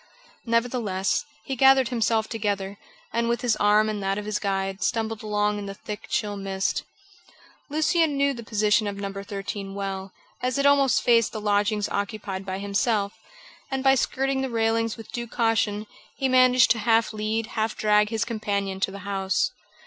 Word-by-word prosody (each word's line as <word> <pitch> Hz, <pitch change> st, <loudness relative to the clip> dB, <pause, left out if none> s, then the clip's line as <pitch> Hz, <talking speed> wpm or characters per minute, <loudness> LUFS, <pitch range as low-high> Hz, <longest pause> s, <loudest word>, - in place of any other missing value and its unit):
Nevertheless, 230 Hz, -4 st, 0 dB, 0.2 s
he 270 Hz, -, -3 dB
gathered 265 Hz, -1 st, +5 dB
himself 225 Hz, -2 st, +1 dB
together, 200 Hz, -3 st, -3 dB, 0.3 s
and 235 Hz, 0 st, +1 dB
with 235 Hz, +1 st, 0 dB
his 245 Hz, -3 st, +2 dB
arm 210 Hz, +1 st, +4 dB
in 215 Hz, -1 st, -2 dB
that 195 Hz, 0 st, -1 dB
of 210 Hz, -, -4 dB
his 210 Hz, 0 st, -1 dB
guide, 195 Hz, -1 st, -2 dB
stumbled 225 Hz, -1 st, -1 dB
along 210 Hz, -1 st, 0 dB
in 200 Hz, -, -6 dB
the 195 Hz, -, -6 dB
thick, 210 Hz, +1 st, -7 dB
chill 205 Hz, -1 st, -1 dB
mist. 195 Hz, -1 st, -1 dB, 0.9 s
Lucian 310 Hz, 0 st, +2 dB
knew 280 Hz, 0 st, +2 dB
the 235 Hz, -, -7 dB
position 215 Hz, -1 st, +2 dB
of 200 Hz, -, -3 dB
No. 200 Hz, -1 st, -4 dB
13 195 Hz, 0 st, -5 dB
well, 195 Hz, -1 st, -4 dB, 0.3 s
as 255 Hz, +1 st, 0 dB
it 280 Hz, -, +1 dB
almost 280 Hz, -2 st, +4 dB
faced 230 Hz, -2 st, +3 dB
the 220 Hz, -, -3 dB
lodgings 205 Hz, 0 st, +1 dB
occupied 200 Hz, -2 st, -4 dB
by 190 Hz, 0 st, -2 dB
himself, 200 Hz, +1 st, 0 dB, 0.6 s
and 265 Hz, -1 st, -2 dB
by 270 Hz, 0 st, +6 dB
skirting 270 Hz, +1 st, 0 dB
the 265 Hz, -, -2 dB
railings 225 Hz, -1 st, 0 dB
with 225 Hz, -, -11 dB
due 240 Hz, -1 st, -4 dB
caution, 225 Hz, -3 st, 0 dB, 0.3 s
he 270 Hz, -, +1 dB
managed 255 Hz, -1 st, +5 dB
to 230 Hz, -, +2 dB
half 225 Hz, 0 st, +2 dB
lead, 215 Hz, +1 st, -1 dB
half 220 Hz, 0 st, -1 dB
drag 210 Hz, 0 st, +3 dB
his 225 Hz, 0 st, -1 dB
companion 200 Hz, -4 st, -2 dB
to 195 Hz, -, +1 dB
the 200 Hz, +1 st, -8 dB
house. 195 Hz, -1 st, 0 dB
215 Hz, 175 wpm, -25 LUFS, 200-235 Hz, 0.9 s, by